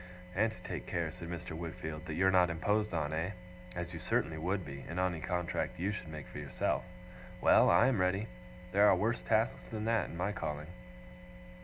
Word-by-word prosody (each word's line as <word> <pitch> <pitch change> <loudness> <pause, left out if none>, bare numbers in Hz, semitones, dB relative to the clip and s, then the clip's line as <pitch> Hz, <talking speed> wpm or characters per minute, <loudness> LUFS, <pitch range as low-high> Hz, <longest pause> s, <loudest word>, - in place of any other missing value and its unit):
'And 110 +5 +2
to 90 -5 -13
take - - -5
care,' 85 -2 -1
said 85 -1 -8
Mr. 85 0 -5
Wickfield, 80 -2 -5
'that 75 - -3
you're 95 +3 +4
not 90 -1 +5
imposed 105 +6 +1
on, 80 -3 -1
eh? 85 +5 -1 0.4
As 85 0 -4
you 85 - -5
certainly 80 0 0
would 90 +3 -1
be, 70 0 -7
in 85 - -4
any 90 -2 +1
contract 90 +1 -1
you 95 +4 +1
should 105 -4 -5
make 75 -2 -7
for - - -7
yourself. 70 -4 -1 0.6
Well! - - +6
I 115 - +6
am 125 -7 +3
ready. 95 +3 +1 0.4
There 100 +2 +6
are 95 - +7
worse 110 +6 0
tasks 110 0 +1
than 110 -1 -3
that, 115 -3 +2
in - - -7
my 90 +4 0
calling. 75 -5 -4
90 Hz, 200 wpm, -33 LUFS, 80-100 Hz, 0.6 s, are